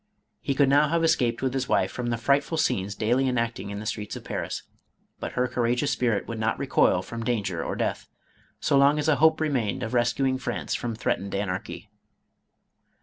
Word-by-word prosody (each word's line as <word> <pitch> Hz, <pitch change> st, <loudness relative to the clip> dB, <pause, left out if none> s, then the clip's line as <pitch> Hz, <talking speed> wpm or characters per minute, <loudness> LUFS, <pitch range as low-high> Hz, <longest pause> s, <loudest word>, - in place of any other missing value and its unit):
He 140 Hz, -, -2 dB
could 140 Hz, 0 st, +4 dB
now 145 Hz, +2 st, +5 dB
have 165 Hz, +2 st, +1 dB
escaped 125 Hz, -7 st, +2 dB
with 130 Hz, -1 st, 0 dB
his 130 Hz, -1 st, -2 dB
wife -, -, +2 dB
from 125 Hz, -1 st, -4 dB
the 120 Hz, 0 st, 0 dB
frightful 140 Hz, +6 st, +1 dB
scenes 100 Hz, -10 st, 0 dB
daily 125 Hz, +5 st, +1 dB
enacting 115 Hz, -5 st, -2 dB
in 100 Hz, 0 st, -5 dB
the 110 Hz, -, -7 dB
streets 105 Hz, -1 st, -4 dB
of -, -, -8 dB
Paris, -, -, -4 dB, 0.6 s
but -, -, -5 dB
her 125 Hz, 0 st, +1 dB
courageous 120 Hz, +3 st, 0 dB
spirit 120 Hz, -6 st, 0 dB
would 115 Hz, -1 st, -5 dB
not 110 Hz, 0 st, 0 dB
recoil -, -, +2 dB
from 115 Hz, 0 st, -6 dB
danger 105 Hz, -8 st, -1 dB
or -, -, -3 dB
death, -, -, -2 dB, 0.5 s
so 140 Hz, -, +3 dB
long 140 Hz, +2 st, +5 dB
as 150 Hz, 0 st, -1 dB
a 155 Hz, -3 st, +4 dB
hope 160 Hz, +1 st, +4 dB
remained 130 Hz, -7 st, -1 dB
of 115 Hz, -, -4 dB
rescuing 130 Hz, +2 st, +1 dB
France 125 Hz, -, -3 dB
from 120 Hz, -2 st, -2 dB
threatened 100 Hz, -4 st, -2 dB
anarchy. 95 Hz, -2 st, -4 dB
125 Hz, 195 wpm, -26 LUFS, 110-140 Hz, 0.6 s, now